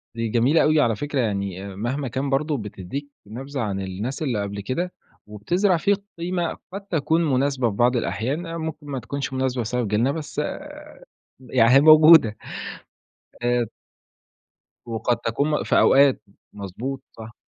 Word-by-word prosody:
دي 115 0 -2
جميلة 125 +8 +3
أوي، 155 0 +3
على 115 -4 +2
فكرة 145 +4 -3
يعني 100 -3 -3
مهما 130 +7 -3
كان 130 +3 -3
برضه 145 +2 0
بتدّيك 105 +6 -6 0.2
نبذة 135 +6 -6
عن 100 -3 -2
الناس 100 +9 -5
اللي 125 -9 -1
قبل 100 0 -5
كده، 170 - -3 0.3
وبتزرع 175 - +1
فيك 200 +4 +1 0.2
قيمة 175 0 -2 0.2
قد 200 - -5
تكون 165 -1 +1
مناسبة 130 -2 +1
في 100 - -6
بعض 120 +4 +3
الأحيان، 130 - -3
ممكن 160 -2 -6
ما 135 -2 -3
تكونش 135 +3 -5
مناسبة 130 -1 -1
بسبب 120 +1 -2
جيلنا، 110 +6 +1
بس 150 -1 -4 1.0
يع 125 -2 +3
أهي 135 - +7
موجودة، 155 -7 +7 1.1
آآ 120 0 +1 1.2
وقد 115 +1 -1
تكون 140 +7 -1
م 150 - 0
في - - +2
أوقات، 140 -3 +5 0.3
مضبوط، 115 +7 -6
صح. 115 +1 -11
130 Hz, 150 wpm, -23 LUFS, 110-150 Hz, 1.2 s, أهي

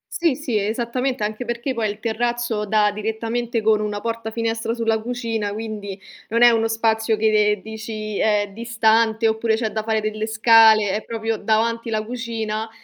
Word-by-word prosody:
Sì, 335 -5 +2
sì, 255 -6 -2
esattamente, 240 +4 -2
anche 215 +3 -3
perché 240 +2 -3
poi 225 -3 -1
il 205 +1 -6
terrazzo 235 -1 -1
dà 210 0 +3
direttamente 225 +2 -3
con 215 -1 +3
una 210 -1 -3
porta 230 0 -4
finestra 225 0 -2
sulla 225 -2 0
cucina, 225 -3 -3
quindi 210 -3 -6 0.3
non 230 +2 +3
è 240 - +8
uno 225 -1 +2
spazio 225 0 +1
che, 210 -1 +3
ehm, 210 - -7
dici 220 -1 -6
è 205 -2 +1
distante 225 0 +2
oppure 220 0 +1
c'è 220 -1 -2
da 220 - -2
fare 220 0 0
delle 215 0 -3
scale. 220 -2 +5
È 210 +3 -1
proprio 225 -1 -3
davanti 230 +2 0
la 215 -1 -1
cucina 225 -2 -4
220 Hz, 175 wpm, -21 LUFS, 215-230 Hz, 0.3 s, è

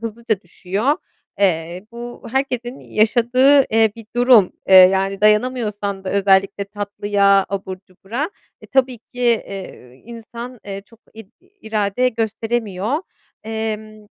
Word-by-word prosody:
hızlıca 225 -2 -3
düşüyor. 195 - -2 0.4
Eee, 175 0 0
bu 240 +1 -9
herkesin 255 -1 -2
yaşadığı, 245 +5 +3
eee, 225 -2 +4
bir 225 -2 -12
durum, 240 -6 +5 0.2
eee, 190 - +6
yani, 190 +1 +6
dayanamıyorsan 210 -3 +1
da 185 - -3
özellikle 195 0 +2
tatlıya, 200 -1 +1
abur 190 -1 -4
cubura, 230 - -5 0.3
e, - - -14
tabii 260 -2 +1
ki, 245 +2 -18
eee, 195 - -3
insan 235 +1 -9 0.3
çok 230 -1 -21
id 220 -2 -12
irade 250 - -2
gösteremiyor. 225 0 -2 0.5
Emm, 215 -1 -5
215 Hz, 115 wpm, -19 LUFS, 195-240 Hz, 0.5 s, eee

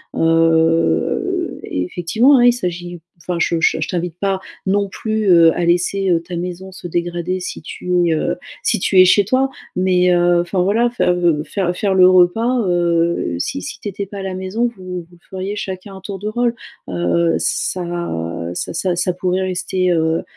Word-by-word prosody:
Heu, 165 - +1
effectivement, 175 - +2
hein, 245 - +5
il 245 - +6
s'agit 175 -5 -5 0.2
enfin, 175 +1 -4
je 165 0 +1
je 165 - +2
je - - -1
t'invite 175 -1 -3
pas 195 -1 0 0.3
non 200 +1 +1
plus, 215 +2 -3
heu, 170 -2 +7
à 175 - 0
laisser, 180 +3 +1
heu, 165 -1 +2
ta 175 +1 -7
maison 180 +2 -6
se 185 -1 -8
dégrader, 175 +1 -2
si - - -6
tu 180 -1 -1
es, - - +2
heu, 155 - -1 0.3
si - - +1
tu 190 - +3
es - - +7
chez 190 +2 +4
toi, 260 +5 +1 0.3
mais, 180 -1 +3
heu, 175 0 +3
enfin, 180 +1 -1
voilà, 220 +6 +2
fai 245 - -1
heu, 175 -4 +2
faire 180 0 -2
faire 195 +1 0
le 185 -1 +6
repas, 225 +8 +3
heu, 170 - +1
si 95 - -3
si - - -7
tu 205 - -4
étais 200 +1 -5
pas 200 +1 -9
à - - -5
la 190 -1 -4
maison, 190 +6 -1
vous 180 -1 -6
vous 165 - -17
le 175 - -18
feriez 190 +2 -4
chacun 190 0 -6
à - - -12
tour 195 0 -6
de 210 +3 -3
rôle, 240 +1 0 0.3
heu, 95 - +1
ça 170 - -3
ça - - -4
ça 185 -2 -1
ça 180 +1 0
pourrait 180 +1 -1
rester, 185 0 -1
heu, 160 -1 +1
180 Hz, 195 wpm, -18 LUFS, 170-190 Hz, 0.3 s, heu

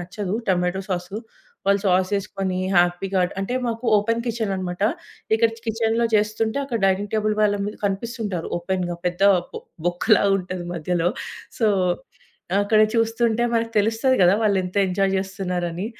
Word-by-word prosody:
నచ్చదు. 190 +2 -4
Tomato 180 0 +1
sauce 180 0 -3 0.6
వాళ్లు 200 0 +3
sauce 185 0 +2
యెసుకొని 195 -1 -3 0.2
హ్యాపీగా 175 +2 +2 0.2
అంటే 195 +6 -2
మాకు 230 +1 -3
ఓపెన్ 230 +3 +1
కిచెన్ 225 -3 -1
అన్నమాట. 180 0 -4 0.5
ఇక్కడ 225 +1 +4 0.2
కిచెన్‌లో 225 +1 +1
చేస్తుంటే, 215 +3 +1
అక్కడ 245 -4 -2
డైనింగ్ 195 +2 0
టేబుల్ 215 0 +1
వాళ్ల 205 -1 +3
మీద 210 - -5
కనిపిస్తుంటారు. 200 -2 -2
ఓపెన్‌గా 175 0 -2
పెద్ద 180 +2 -2 0.3
బో - - -5 0.3
బొక్కలాగా 200 +3 +3
ఉంటది 185 -1 -5
మధ్యలో. 175 +1 0 0.5
సో, 225 - +3 1.0
అక్కడ 215 +1 +3
చూస్తుంటే 230 0 +1
మనకు 230 0 0
తెలుస్తది 225 +5 +2
కదా 180 +1 +6
వాళ్లు 205 -3 +3
ఎంత 180 +2 -7
ఎంజాయ్ 195 +1 +1
చేస్తున్నారని. 185 -1 -3
200 Hz, 140 wpm, -23 LUFS, 180-225 Hz, 1.0 s, కదా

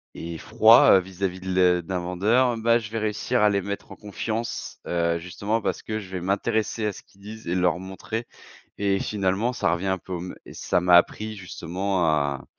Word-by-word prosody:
et 85 0 -6
froids, 110 +3 +6
heu, - - +4
vis-à-vis 95 0 -4
de 95 - -9
le 90 -1 +4
d'un 90 +1 -3
vendeur, 105 +8 +2
hem, 115 - -5
bah, 115 +1 +4
je 110 -2 -8
vais 115 - -3
réussir 110 +3 -1
à 105 - +5
les 100 -1 +1
mettre 100 +1 -6
en - - -8
confiance. 110 +3 -5
Heu, 85 -1 0
justement 100 +6 -2
parce 95 -3 -2
que 110 0 -3
je 95 -3 -10
vais 90 -2 -5
m'intéresser 105 +3 -1
à 105 - -2
ce - - -12
qu'ils 100 - -25
disent 110 0 -10
et 90 - 0
leur 90 -1 +2
montrer 95 +5 -5 0.5
et 100 -1 +1
finalement 100 +4 0
ça 95 - 0
revient 90 +2 -2
un 95 0 0
peu 95 - -10
au 85 - -3
mê 90 +1 -7 0.2
ça - - 0
m'a 90 0 +4
appris 110 +4 +2
justement 90 +1 -2
à 70 -3 0
95 Hz, 215 wpm, -25 LUFS, 90-110 Hz, 0.5 s, froids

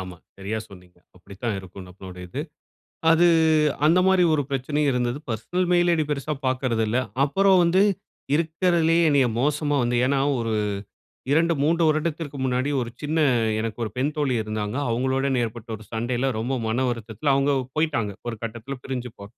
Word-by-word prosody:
ஆமா. 90 -1 -8 0.2
சரியாக 110 +3 -3
சொன்னீங்க. 90 -2 -16 0.2
அப்படித்தான் 100 +4 -5
இருக்கும் 95 0 -10
நம்மளுடைய 90 0 -10
இது. 135 - -4 0.7
அது 165 +2 +5 0.6
அந்த 170 +4 +5
மாரி 190 -1 +4
ஒரு 145 -2 +1
பிரச்சனையும் 145 +2 0
இருந்தது. 125 +1 -1
பெர்சனல் 175 +12 -1
மெயில் 175 0 +4
ஐ - - +2
டி 155 - +1
பெரிசா 150 +2 -2
பாக்கிறதில்லை. 125 -2 0 0.2
அப்புறம் 195 +6 +4
வந்து 180 +3 +3 0.5
இருக்கிறதிலேயே 165 0 +2
என்னைய 140 -3 +4
மோசமா 145 +1 +1
வந்து, 120 +1 0
ஏன்னா 135 0 +1 0.2
ஒரு 115 -1 -2 0.8
2, 165 +3 +3
3 165 +3 +2
வருடத்திற்கு 155 -1 -2
முன்னாடி 130 +2 0
ஒரு 120 -1 -4
சின்ன, 155 +2 -1 0.4
எனக்கு 110 0 -4
ஒரு 110 - -5
பெண் 140 +4 0
தோழி 140 -4 0
இருந்தாங்க. 110 +1 -4
அவுங்களோட 130 +3 0
என 130 -2 +1
ஏற்பட்ட 115 0 -8
ஒரு 110 - -14
சண்டையில, 120 +3 -1
ரொம்ப 125 +4 -1
மன 125 +4 0
வருத்தத்தில 120 +4 -2
அவுங்க 140 +1 +2 0.2
போய்ட்டாங்க. 120 -10 0 0.2
ஒரு 115 - -4
கட்டத்தில 120 +4 -5
பிரிஞ்சு 125 -2 -4
போ 100 - -10
130 Hz, 160 wpm, -24 LUFS, 110-155 Hz, 0.8 s, அது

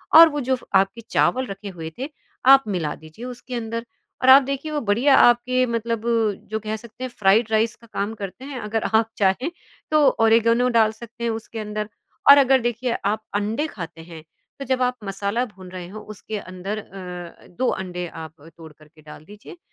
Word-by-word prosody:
और 330 0 +11
वो 290 -1 -3
जो 260 +1 +1
फ़ 245 - -13
आपके 195 +5 0
चावल 260 +1 +2
रखे 195 +1 -7
हुए 165 -3 -7
थे, 275 +4 -4 0.4
आप 270 0 +8
मिला 170 -7 -2
दीजिए 160 +10 -12
उसके 250 0 -7
अंदर 230 0 -4 0.4
और 260 - +5
आप 270 +1 +9
देखिए 275 +3 -4
वो 300 - -1
बढ़िया 235 +6 +3
आपके 255 +1 +4
मतलब 230 -1 -2 0.5
जो 220 - -1
कह 215 0 -4
सकते 235 +3 -10
हैं 255 - -3
फ्राइड 210 +2 +4
राइस 220 +1 +2
का 230 - -19
काम 205 +3 -2
करते 200 +7 -7
हैं। 275 -3 -6
अगर 215 0 -2
आप 225 0 +1
चाहें 200 - +1 0.4
तो 305 - +4 0.2
ओरिगैनो 230 +2 +4
डाल 225 -2 +4
सकते 235 +1 -11
हैं 230 - +1
उसके 225 0 -6
अंदर। 210 0 -4 0.4
और 285 - +11
अगर 265 -1 +5
देखिए 240 +1 -1
आप 215 +2 0
अंडे 215 +8 -1
खाते 170 - -8
हैं, 160 -2 -11 0.4
तो 275 - -5
जब 260 -1 0
आप 250 0 +1
मसाला 200 +4 -2
भून 190 -5 -13
रहे 180 -2 -7
हो 215 +3 -8
उसके 215 +2 -6
अंदर 185 +3 -6
अ, 180 -4 -9
2 255 +9 -2
अंडे 180 -1 -4
आप 160 -2 -10 0.2
तोड़ 160 -2 -12
करके 155 +1 -21
डाल 150 0 -13
दीजिए, 210 - -13
220 Hz, 200 wpm, -23 LUFS, 195-250 Hz, 0.5 s, और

